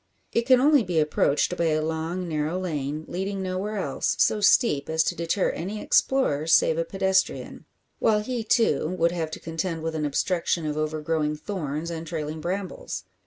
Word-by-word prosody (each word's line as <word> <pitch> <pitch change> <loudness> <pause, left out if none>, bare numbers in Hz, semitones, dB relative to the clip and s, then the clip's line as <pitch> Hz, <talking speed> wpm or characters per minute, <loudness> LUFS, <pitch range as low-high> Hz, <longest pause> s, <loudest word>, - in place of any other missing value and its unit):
It 235 +1 0
can 255 -1 +6
only 290 +1 +5
be 175 -6 0
approached 150 +2 +1
by 170 - 0
a 155 -1 +2
long, 160 +3 -3
narrow 155 +2 -1
lane, 155 -3 -3
leading 190 +2 -3
nowhere 190 +3 -3
else, 145 -9 -1
so 210 - +2
steep 180 - +3
as 160 0 +2
to 175 - -1
deter 170 +3 0
any 200 +5 -5
explorer 160 - +2
save 165 0 +4
a - - +2
pedestrian; 190 +2 -1 0.3
while 215 -2 +3
he, 240 +1 -3
too, 220 - +2
would 170 0 +3
have 165 -3 -2
to 155 - -7
contend 165 0 -3
with 165 0 -2
an 155 -1 -2
obstruction 170 +3 0
of 150 -1 -2
overgrowing 155 0 -1
thorns 155 -2 -4
and 165 0 -6
trailing 155 -1 -4
brambles. 185 +3 -4
165 Hz, 175 wpm, -25 LUFS, 155-190 Hz, 0.3 s, can